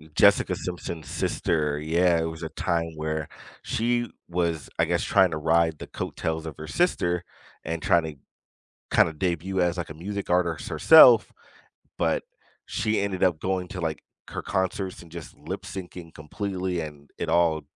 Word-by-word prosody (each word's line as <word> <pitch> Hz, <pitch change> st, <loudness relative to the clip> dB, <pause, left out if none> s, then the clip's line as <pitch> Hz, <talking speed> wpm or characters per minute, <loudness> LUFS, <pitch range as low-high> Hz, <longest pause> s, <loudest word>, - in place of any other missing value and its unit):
Jessica -, -, +5 dB
Simpson's 85 Hz, -4 st, -6 dB
sister, 75 Hz, -2 st, 0 dB
yeah, 85 Hz, +2 st, +2 dB
it -, -, 0 dB
was 80 Hz, 0 st, -6 dB
a 80 Hz, -, -3 dB
time 85 Hz, -2 st, -1 dB
where 80 Hz, -1 st, -3 dB, 0.3 s
she 120 Hz, 0 st, 0 dB, 0.2 s
was, 85 Hz, -3 st, -1 dB
I -, -, +4 dB
guess, -, -, 0 dB
trying 95 Hz, -3 st, +4 dB
to 80 Hz, -, -2 dB
ride 80 Hz, 0 st, +2 dB
the -, -, -7 dB
coattails 80 Hz, 0 st, -4 dB
of 80 Hz, -, -7 dB
her 80 Hz, -, -7 dB
sister 90 Hz, -, +1 dB, 0.4 s
and 80 Hz, 0 st, -3 dB
trying 85 Hz, -1 st, +3 dB
to, 80 Hz, -2 st, -6 dB, 0.8 s
kinda 80 Hz, -, +5 dB
debut 90 Hz, +2 st, -2 dB
as, 90 Hz, +1 st, 0 dB
like, 85 Hz, -, -3 dB
a 75 Hz, -, -6 dB
music 100 Hz, +5 st, -5 dB
artist 85 Hz, -3 st, +1 dB
herself, 125 Hz, -9 st, +7 dB, 0.6 s
but -, -, 0 dB, 0.4 s
she 110 Hz, -1 st, 0 dB
ended 95 Hz, -2 st, 0 dB
up 85 Hz, -4 st, +2 dB
going 95 Hz, -1 st, -1 dB
to, 90 Hz, -, -6 dB
like, 80 Hz, -2 st, -3 dB, 0.3 s
her -, -, -5 dB
concerts 95 Hz, 0 st, -2 dB
and 85 Hz, -, -15 dB
just 85 Hz, -3 st, -9 dB
lip -, -, -6 dB
syncing 90 Hz, -3 st, -8 dB
completely 90 Hz, +2 st, -3 dB
and 75 Hz, -2 st, -9 dB
it -, -, -2 dB
all, 80 Hz, -3 st, +3 dB
85 Hz, 165 wpm, -26 LUFS, 80-95 Hz, 0.8 s, herself